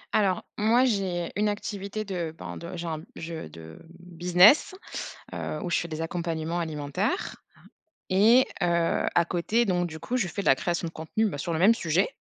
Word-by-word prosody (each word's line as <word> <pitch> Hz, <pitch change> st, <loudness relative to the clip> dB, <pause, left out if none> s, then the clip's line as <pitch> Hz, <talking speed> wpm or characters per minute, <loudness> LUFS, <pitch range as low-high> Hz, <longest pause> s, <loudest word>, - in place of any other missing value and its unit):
Alors, 195 Hz, -4 st, +2 dB
moi, 235 Hz, +4 st, +4 dB
j'ai 190 Hz, -7 st, -1 dB
une 210 Hz, +1 st, +2 dB
activité 205 Hz, +1 st, -4 dB
de, 170 Hz, -5 st, -4 dB
ben, -, -, -7 dB
de 170 Hz, +1 st, -7 dB
j'ai 170 Hz, -, -5 dB
un 160 Hz, -2 st, -3 dB
je 165 Hz, -, -6 dB
de, 80 Hz, +1 st, -12 dB
mmh, 175 Hz, 0 st, -15 dB
business, 180 Hz, -, +6 dB, 0.6 s
heu, 155 Hz, -, -4 dB
où 175 Hz, -, -3 dB
je -, -, +2 dB
fais 170 Hz, -, -2 dB
des 160 Hz, 0 st, -5 dB
accompagnements 165 Hz, 0 st, -2 dB
alimentaires, 160 Hz, -, -2 dB, 0.2 s
hein -, -, -23 dB, 0.5 s
et 225 Hz, +7 st, +6 dB, 0.2 s
heu, 170 Hz, -2 st, +1 dB
à 170 Hz, -, +4 dB
côté, 210 Hz, +8 st, +1 dB
donc 175 Hz, -2 st, +1 dB
du 160 Hz, -, -8 dB
coup, 250 Hz, -, -3 dB
je 225 Hz, -8 st, +1 dB
fais 190 Hz, +4 st, -4 dB
de -, -, -11 dB
la -, -, +8 dB
création 170 Hz, +3 st, -2 dB
de -, -, -7 dB
contenu, 160 Hz, +8 st, -1 dB
bah, 145 Hz, -8 st, -4 dB
sur 170 Hz, +4 st, -2 dB
le 160 Hz, -, -1 dB
même 210 Hz, +6 st, +6 dB
sujet, 170 Hz, -2 st, +1 dB
175 Hz, 200 wpm, -27 LUFS, 165-205 Hz, 0.6 s, la